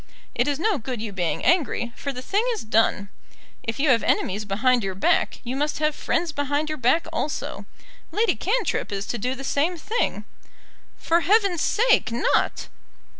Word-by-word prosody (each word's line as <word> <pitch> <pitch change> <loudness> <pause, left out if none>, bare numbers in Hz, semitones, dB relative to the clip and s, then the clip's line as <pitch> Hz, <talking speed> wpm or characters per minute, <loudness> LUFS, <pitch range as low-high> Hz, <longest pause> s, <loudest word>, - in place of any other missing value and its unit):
It 245 +3 +1
is 285 -1 0
no 380 +1 +1
good 245 0 -5
you 215 -1 -4
being 180 -4 -2
angry, 285 -8 +1
for 280 - -4
the 255 -1 -7
thing 405 - +1
is 440 - -5
done. 215 -2 +1 0.5
If 225 +3 -4
you 290 +1 +2
have 235 -3 +5
enemies 205 +3 0
behind 235 +4 +2
your 190 -1 -3
back, 330 - +1
you 250 +1 -4
must 295 +2 -1
have 305 0 +1
friends 330 +2 -1
behind 290 +1 -1
your 310 - -3
back 255 +7 +3
also. 300 - -3 0.4
Lady 445 +2 +2
Cantrip 470 - -1
is 200 0 -3
to 240 - -4
do 250 +5 -1
the 270 - -8
same 310 +6 0
thing." 435 +9 -2 0.7
"For 335 +1 +2
Heaven's 395 -2 +3
sake, 465 - +3
not." 235 - 0
280 Hz, 175 wpm, -24 LUFS, 230-335 Hz, 0.7 s, have